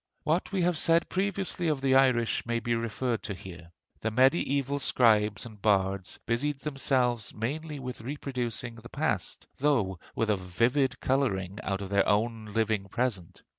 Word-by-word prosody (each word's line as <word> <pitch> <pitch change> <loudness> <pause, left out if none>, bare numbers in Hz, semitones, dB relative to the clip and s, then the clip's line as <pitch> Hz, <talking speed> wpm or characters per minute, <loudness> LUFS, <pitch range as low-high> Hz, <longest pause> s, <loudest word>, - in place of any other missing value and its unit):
What 165 +4 0
we 190 -3 +1
have 175 -2 +1
said 165 0 +3
previously 190 -2 -1
of 150 -3 +1
the 135 -1 +2
Irish 130 -4 +3
may 120 0 -1
be 120 0 -1
referred 115 +1 -1
to 100 - -4
here. 85 -2 -11 0.3
The 110 - -1
mediæval 135 +3 +2
scribes 105 -5 +3
and 110 -4 -12
bards 95 -2 +1
busied 135 +5 0
themselves 125 -6 0
mainly 150 +7 -3
with 125 -3 -6
reproducing 125 -2 -4
the 115 +1 -11
past, - - -2
though 115 - +1 0.2
with 110 -1 +1
a 105 - +2
vivid 120 +8 +1
coloring 105 -8 0
out 100 -1 -2
of 95 - -6
their 100 -1 +2
own 110 +2 +1
living 105 -1 0
present. 100 -4 -3
120 Hz, 160 wpm, -29 LUFS, 105-135 Hz, 0.3 s, said